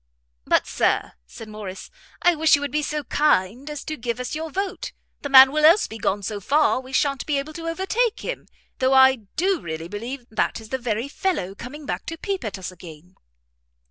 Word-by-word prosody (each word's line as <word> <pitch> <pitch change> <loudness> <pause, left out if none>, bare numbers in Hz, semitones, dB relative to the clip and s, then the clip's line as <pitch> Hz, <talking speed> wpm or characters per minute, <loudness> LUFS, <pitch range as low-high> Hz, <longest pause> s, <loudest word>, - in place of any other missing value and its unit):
"But, - - +3
Sir," - - 0 0.2
said 220 - -10
Morrice, 210 -3 -8 0.3
"I 355 - +6
wish 320 0 +4
you 285 - -3
would 285 - -3
be 300 - 0
so 300 0 -3
kind 260 -2 +1
as 295 -2 -6
to 310 - -4
give 240 -2 -4
us 250 - -4
your 320 +1 -4
vote; 390 +5 -4 0.3
the 285 - -4
man 265 -1 +9
will 305 +1 0
else 330 +7 +7
be 225 - -8
gone 200 0 -1
so 205 +1 -3
far, 290 +7 +2
we 260 0 -11
sha'n't 275 0 +1
be 295 -2 +1
able 285 +3 -4
to 330 +1 -6
overtake 400 +7 0
him. - - -5 0.3
Though 260 +1 +3
I 265 0 +7 0.2
do 370 0 +1
really 160 0 -5
believe 235 +7 -6
that 220 - 0
is 220 -1 -12
the 265 - -2
very 235 0 -2
fellow 280 - -2
coming 275 +8 -9
back - - -4
to 330 - -5
peep 390 +3 -3
at 210 -2 -4
us 185 -1 -6
again!" 175 -1 -13
270 Hz, 210 wpm, -23 LUFS, 215-310 Hz, 0.3 s, man